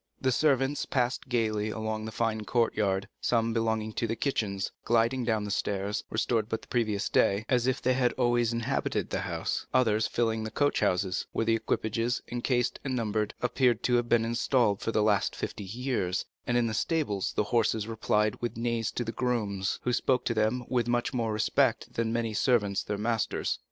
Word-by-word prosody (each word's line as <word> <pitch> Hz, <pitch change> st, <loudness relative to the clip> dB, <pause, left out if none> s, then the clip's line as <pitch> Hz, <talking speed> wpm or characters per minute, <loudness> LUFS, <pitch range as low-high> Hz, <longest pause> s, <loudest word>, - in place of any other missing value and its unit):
The 130 Hz, -, +1 dB
servants 135 Hz, 0 st, +2 dB
passed 125 Hz, 0 st, -1 dB
gayly 110 Hz, -3 st, 0 dB
along 110 Hz, 0 st, -3 dB
the 110 Hz, -, -5 dB
fine 110 Hz, -1 st, -1 dB
courtyard; 105 Hz, -4 st, +1 dB
some, 115 Hz, -1 st, +1 dB
belonging 110 Hz, -1 st, 0 dB
to 115 Hz, -, -1 dB
the 115 Hz, -, -1 dB
kitchens, 105 Hz, -6 st, -1 dB
gliding 120 Hz, +2 st, +2 dB
down 110 Hz, -3 st, +1 dB
the 105 Hz, -, -4 dB
stairs, 100 Hz, +2 st, -1 dB
restored 110 Hz, 0 st, 0 dB
but 110 Hz, -, -3 dB
the -, -, -14 dB
previous 110 Hz, -4 st, 0 dB
day, 100 Hz, +3 st, +2 dB
as 125 Hz, -2 st, +2 dB
if 130 Hz, 0 st, 0 dB
they 130 Hz, -, +3 dB
had 125 Hz, -1 st, +2 dB
always 120 Hz, -2 st, +2 dB
inhabited 115 Hz, 0 st, -1 dB
the -, -, 0 dB
house; -, -, -3 dB
others 110 Hz, -4 st, +3 dB
filling 115 Hz, -2 st, 0 dB
the 110 Hz, -, -3 dB
coach 145 Hz, +5 st, +1 dB
houses, 90 Hz, 0 st, 0 dB
where 115 Hz, -, 0 dB
the 115 Hz, -, +3 dB
equipages, 115 Hz, +1 st, 0 dB
encased 120 Hz, 0 st, 0 dB
and 135 Hz, -2 st, -2 dB
numbered, 110 Hz, -3 st, -1 dB
appeared 125 Hz, 0 st, +2 dB
to 125 Hz, -, +1 dB
have 120 Hz, 0 st, -1 dB
been 115 Hz, -1 st, +3 dB
installed 115 Hz, -3 st, +1 dB
for -, -, -1 dB
the 110 Hz, -, +2 dB
last 105 Hz, -2 st, +2 dB
fifty 100 Hz, -, -5 dB
years; 105 Hz, -4 st, -2 dB, 0.2 s
and 120 Hz, -, +2 dB
in 120 Hz, -, +3 dB
the 110 Hz, -, -1 dB
stables 110 Hz, -, -1 dB
the -, -, +2 dB
horses 110 Hz, -2 st, +2 dB
replied 110 Hz, -1 st, 0 dB
with 120 Hz, -2 st, -3 dB
neighs 115 Hz, -1 st, -1 dB
to 120 Hz, -, -2 dB
the 115 Hz, -, -4 dB
grooms, 105 Hz, -6 st, -1 dB
who 125 Hz, -, 0 dB
spoke 130 Hz, +1 st, +1 dB
to 115 Hz, -, +1 dB
them 110 Hz, +3 st, 0 dB
with 120 Hz, -2 st, 0 dB
much 120 Hz, +2 st, 0 dB
more 115 Hz, -3 st, 0 dB
respect 105 Hz, 0 st, +1 dB
than 115 Hz, -1 st, -1 dB
many 115 Hz, -1 st, -1 dB
servants 105 Hz, -3 st, +2 dB
pay -, -, -13 dB
their 105 Hz, -, -1 dB
masters. 110 Hz, +1 st, -1 dB
115 Hz, 195 wpm, -29 LUFS, 110-120 Hz, 0.2 s, they